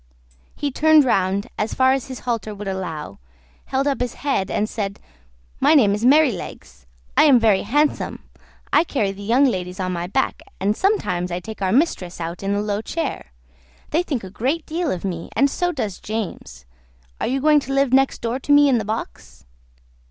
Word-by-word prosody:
He 290 Hz, -1 st, -2 dB
turned 310 Hz, +1 st, +5 dB
round 195 Hz, -3 st, +1 dB
as 215 Hz, -, -1 dB
far 260 Hz, 0 st, +4 dB
as 270 Hz, -2 st, -2 dB
his 260 Hz, -2 st, -8 dB
halter 230 Hz, -3 st, -3 dB
would 205 Hz, 0 st, -7 dB
allow, 175 Hz, -, -5 dB, 0.5 s
held 270 Hz, +1 st, -1 dB
up 280 Hz, -3 st, 0 dB
his 245 Hz, -1 st, -2 dB
head, 270 Hz, -9 st, -1 dB
and 210 Hz, -, 0 dB
said, 200 Hz, -3 st, -4 dB, 0.6 s
"My 315 Hz, -, +5 dB
name 215 Hz, -9 st, +5 dB
is 210 Hz, +2 st, -3 dB
Merrylegs. 240 Hz, -, +1 dB, 0.3 s
I -, -, +6 dB
am 270 Hz, -5 st, +6 dB
very 215 Hz, -4 st, +3 dB
handsome; 295 Hz, +8 st, 0 dB, 0.5 s
I 315 Hz, -, +6 dB
carry 220 Hz, -, -1 dB
the 195 Hz, +1 st, -10 dB
young 240 Hz, +7 st, +3 dB
ladies 185 Hz, -6 st, -2 dB
on 185 Hz, -1 st, -2 dB
my 175 Hz, 0 st, -3 dB
back, 265 Hz, +8 st, -1 dB, 0.2 s
and 205 Hz, +2 st, +1 dB
sometimes 180 Hz, -, 0 dB
I 175 Hz, -, -2 dB
take 220 Hz, +2 st, -9 dB
our 190 Hz, -1 st, +1 dB
mistress 220 Hz, -, 0 dB
out 170 Hz, +1 st, -5 dB
in 195 Hz, 0 st, -2 dB
the 205 Hz, -, 0 dB
low 210 Hz, 0 st, -2 dB
chair. 295 Hz, -, -4 dB, 0.6 s
They 325 Hz, -, +2 dB
think 280 Hz, -, -3 dB
a 190 Hz, -, -8 dB
great 270 Hz, -, -1 dB
deal 335 Hz, 0 st, -2 dB
of 185 Hz, -4 st, -3 dB
me, 170 Hz, -3 st, -4 dB
and 280 Hz, 0 st, +3 dB
so 355 Hz, 0 st, 0 dB
does 215 Hz, -, -4 dB
James. 185 Hz, -, -6 dB, 0.5 s
Are -, -, -1 dB
you 265 Hz, +2 st, 0 dB
going 300 Hz, +2 st, +5 dB
to 275 Hz, -, -7 dB
live 275 Hz, -2 st, +2 dB
next 270 Hz, 0 st, +3 dB
door 235 Hz, +2 st, -2 dB
to 290 Hz, -, -3 dB
me 290 Hz, 0 st, +6 dB
in 250 Hz, -3 st, +3 dB
the 215 Hz, -, -4 dB
box?" 210 Hz, -, -6 dB
225 Hz, 195 wpm, -21 LUFS, 190-275 Hz, 0.6 s, I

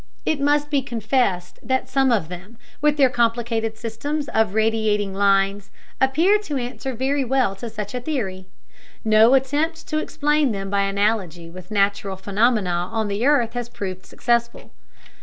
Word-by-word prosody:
It 305 Hz, -3 st, 0 dB
must 295 Hz, +1 st, +1 dB
be 280 Hz, -2 st, +2 dB
confessed 225 Hz, -7 st, -1 dB
that 260 Hz, +3 st, -1 dB
some 270 Hz, -2 st, +2 dB
of 205 Hz, -9 st, +1 dB
them, 180 Hz, +6 st, -10 dB, 0.2 s
with 300 Hz, 0 st, +2 dB
their 275 Hz, -2 st, +6 dB
complicated 230 Hz, -2 st, 0 dB
systems 280 Hz, +7 st, -4 dB
of 220 Hz, -3 st, +1 dB
radiating 215 Hz, -2 st, +1 dB
lines, 195 Hz, 0 st, +1 dB, 0.3 s
appear 325 Hz, +11 st, +4 dB
to 305 Hz, -9 st, -4 dB
answer 255 Hz, +1 st, -4 dB
very 270 Hz, +3 st, 0 dB
well 255 Hz, -5 st, +1 dB
to 235 Hz, +3 st, -6 dB
such 210 Hz, -1 st, -6 dB
a 250 Hz, -, -3 dB
theory. 195 Hz, -11 st, -4 dB, 0.6 s
No 220 Hz, +4 st, +6 dB
attempt 295 Hz, +5 st, 0 dB
to 310 Hz, -, 0 dB
explain 295 Hz, -4 st, +1 dB
them 195 Hz, -1 st, -5 dB
by 200 Hz, 0 st, +2 dB
analogy 195 Hz, -4 st, -1 dB
with 185 Hz, +2 st, -11 dB
natural 200 Hz, -1 st, 0 dB
phenomena 195 Hz, -3 st, 0 dB
on 220 Hz, -2 st, -1 dB
the 200 Hz, +3 st, -2 dB
earth 245 Hz, -6 st, +3 dB
has 245 Hz, -1 st, -4 dB
proved 185 Hz, -5 st, -6 dB
successful. 235 Hz, -1 st, -1 dB
230 Hz, 160 wpm, -22 LUFS, 200-270 Hz, 0.6 s, their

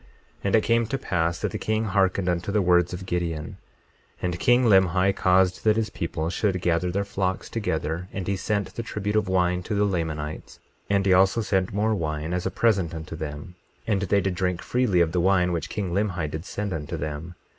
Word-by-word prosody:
22:9 60 Hz, -, -27 dB, 0.4 s
And 100 Hz, -, +3 dB
it 110 Hz, -, +4 dB
came 115 Hz, -1 st, +2 dB
to 135 Hz, -, -1 dB
pass 85 Hz, -7 st, -1 dB
that -, -, -1 dB
the -, -, -4 dB
king 110 Hz, 0 st, 0 dB
hearkened 95 Hz, -3 st, +1 dB
unto 90 Hz, +2 st, -1 dB
the 105 Hz, -, +2 dB
words 90 Hz, -1 st, +3 dB
of 90 Hz, +1 st, -6 dB
Gideon. 85 Hz, -4 st, -3 dB, 0.6 s
22:10 -, -, -22 dB
And 90 Hz, -1 st, -1 dB
king 125 Hz, +1 st, +4 dB
Limhi 95 Hz, -2 st, +4 dB
caused 95 Hz, 0 st, +3 dB
that 110 Hz, -1 st, +4 dB
his 110 Hz, -1 st, -1 dB
people 85 Hz, -1 st, -3 dB
should 95 Hz, -1 st, 0 dB
gather 90 Hz, 0 st, +1 dB
their 100 Hz, +3 st, -1 dB
flocks 95 Hz, -2 st, -2 dB
together; 85 Hz, -5 st, -2 dB
and 95 Hz, -2 st, -5 dB
he 100 Hz, -, +1 dB
sent 100 Hz, +1 st, -2 dB
the -, -, -4 dB
tribute 105 Hz, -2 st, -3 dB
of 105 Hz, -3 st, +2 dB
wine 90 Hz, -1 st, +1 dB
to 105 Hz, +4 st, -3 dB
the 105 Hz, 0 st, +3 dB
Lamanites; 80 Hz, -5 st, -3 dB, 0.3 s
and 100 Hz, -1 st, +2 dB
he 95 Hz, -, +5 dB
also 95 Hz, +5 st, +4 dB
sent 95 Hz, -3 st, 0 dB
more 105 Hz, +2 st, +1 dB
wine, 80 Hz, -3 st, -2 dB
as 90 Hz, 0 st, -1 dB
a -, -, 0 dB
present 95 Hz, -8 st, +1 dB
unto 80 Hz, 0 st, -7 dB
them; 75 Hz, +1 st, -6 dB, 0.3 s
and 100 Hz, -4 st, +1 dB
they 100 Hz, +1 st, +2 dB
did 95 Hz, -1 st, -1 dB
drink 90 Hz, -1 st, -1 dB
freely 120 Hz, -8 st, +2 dB
of 85 Hz, -1 st, +2 dB
the 90 Hz, -, +1 dB
wine 90 Hz, -1 st, +3 dB
which 85 Hz, -2 st, -3 dB
king 100 Hz, -4 st, -3 dB
Limhi 90 Hz, -6 st, -1 dB
did 80 Hz, +3 st, -5 dB
send 100 Hz, -1 st, -4 dB
unto 75 Hz, -3 st, -4 dB
them. 75 Hz, +3 st, -5 dB
95 Hz, 220 wpm, -25 LUFS, 85-100 Hz, 0.6 s, he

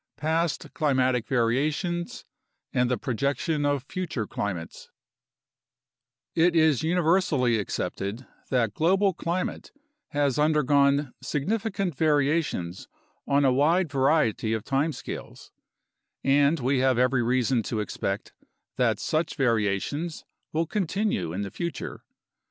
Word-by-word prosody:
4 155 Hz, -, -4 dB
PAST 165 Hz, -2 st, -1 dB
CLIMATIC 130 Hz, -6 st, +1 dB
VARIATIONS 145 Hz, +8 st, 0 dB, 0.5 s
AND 125 Hz, 0 st, +2 dB
THE 125 Hz, -, +1 dB
PROJECTION 140 Hz, +6 st, -1 dB
OF 145 Hz, -3 st, 0 dB
FUTURE 150 Hz, -7 st, -4 dB
CLIMATES 95 Hz, -6 st, -5 dB, 1.4 s
It 170 Hz, +1 st, +3 dB
is 160 Hz, -5 st, +4 dB
universally 160 Hz, -, +2 dB
accepted 105 Hz, +3 st, -4 dB, 0.2 s
that 115 Hz, -6 st, +1 dB
global 190 Hz, -, +2 dB
climate 170 Hz, +2 st, -3 dB, 0.4 s
has 145 Hz, -2 st, 0 dB
undergone 145 Hz, -2 st, +3 dB
significant 195 Hz, +2 st, -2 dB
variations 145 Hz, -, 0 dB, 0.4 s
on 140 Hz, 0 st, +3 dB
a 130 Hz, -, +4 dB
wide 160 Hz, +5 st, +2 dB
variety 135 Hz, -6 st, +2 dB
of 110 Hz, -2 st, -2 dB
time 140 Hz, +5 st, 0 dB
scales, -, -, -8 dB, 0.7 s
and 140 Hz, +3 st, +3 dB
we 130 Hz, +1 st, +1 dB
have 130 Hz, -1 st, +3 dB
every 125 Hz, 0 st, +3 dB
reason 125 Hz, 0 st, +2 dB
to 110 Hz, 0 st, -3 dB
expect 100 Hz, -1 st, -3 dB, 0.4 s
that -, -, +2 dB
such 155 Hz, +1 st, -1 dB
variations 125 Hz, -, -1 dB, 0.3 s
will 165 Hz, +2 st, 0 dB
continue 195 Hz, -, -1 dB
in 95 Hz, +4 st, -3 dB
the 100 Hz, -2 st, -4 dB
future. 170 Hz, -5 st, -5 dB
140 Hz, 115 wpm, -26 LUFS, 125-160 Hz, 1.4 s, is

